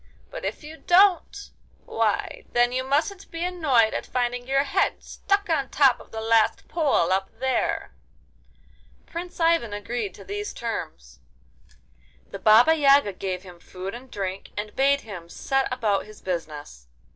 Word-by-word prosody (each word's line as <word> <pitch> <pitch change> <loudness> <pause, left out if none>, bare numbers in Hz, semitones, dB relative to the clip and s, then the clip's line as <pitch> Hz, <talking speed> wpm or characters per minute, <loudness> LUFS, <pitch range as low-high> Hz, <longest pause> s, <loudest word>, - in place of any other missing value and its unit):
But - - -7
if - - -4
you 310 +2 -10
don't—why, 365 +1 0
then 240 0 +3
you 255 +1 -1
mustn't 310 +9 -1
be 330 +1 -4
annoyed 285 -11 +2
at - - -4
finding 245 0 -2
your 275 +1 +2
head 365 +8 0
stuck 400 +1 -1
on 290 -6 0
top 270 -4 +4
of - - -15
the 220 - -5
last 225 -1 +2
pole 285 - +1
up 190 0 -1
there.' 265 0 -1 1.1
Prince 350 +2 -7
Ivan 330 -10 +2
agreed 205 -1 -4
to - - -12
these 410 +1 -5
terms. 145 - -6 1.1
The - - -8
Baba 225 +9 +6
Yaga 280 -8 +4
gave 185 0 -4
him 180 -2 -13
food 185 +2 -7
and 250 +2 -10
drink, 195 -2 -5
and 210 0 -5
bade 275 +1 +3
him 180 -6 -9
set 270 +8 -1
about 215 -6 0
his 215 - -13
business. 150 - -6
245 Hz, 150 wpm, -25 LUFS, 205-310 Hz, 1.1 s, Baba